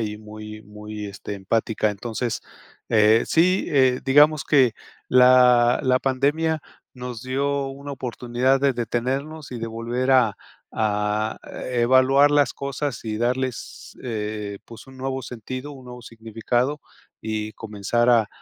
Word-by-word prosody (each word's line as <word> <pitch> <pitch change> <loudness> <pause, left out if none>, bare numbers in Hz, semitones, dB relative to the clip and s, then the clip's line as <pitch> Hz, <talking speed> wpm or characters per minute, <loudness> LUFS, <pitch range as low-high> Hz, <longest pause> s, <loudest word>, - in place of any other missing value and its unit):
y 105 -1 -3
muy 105 0 -10
muy, 105 0 -8
este, 100 0 -7
empática. 110 +2 0
Entonces, 115 +3 -4 0.5
eh, 110 +1 +4
sí, 180 +3 +2
eh, 130 -3 +3
digamos 145 +2 +5
que 130 -6 +4 0.4
la 125 -1 +5
la 130 0 +3
pandemia 145 +5 0 0.3
nos 125 -2 -7
dio 140 +2 -1
una 140 +1 -8
oportunidad 125 0 0
de 140 -1 +3
detenernos 130 +6 -3
y 120 - -5
de 115 - -4
volver 120 +3 -2
a 115 -6 +4 0.4
a 105 0 -1 0.4
evaluar 130 +4 +4
las 145 -1 +3
cosas 140 -2 -4
y 110 -1 -3
darles, 125 +1 -3
eh, 105 -3 -4
pues 115 +3 -13
un 130 0 -14
nuevo 135 0 -3
sentido, 130 +4 -7
un 130 -2 -12
nuevo 125 0 -9
significado 115 +5 -2 0.4
y 110 -1 -4
comenzar 110 +2 -1
a 115 -3 +4
125 Hz, 135 wpm, -23 LUFS, 110-135 Hz, 0.5 s, digamos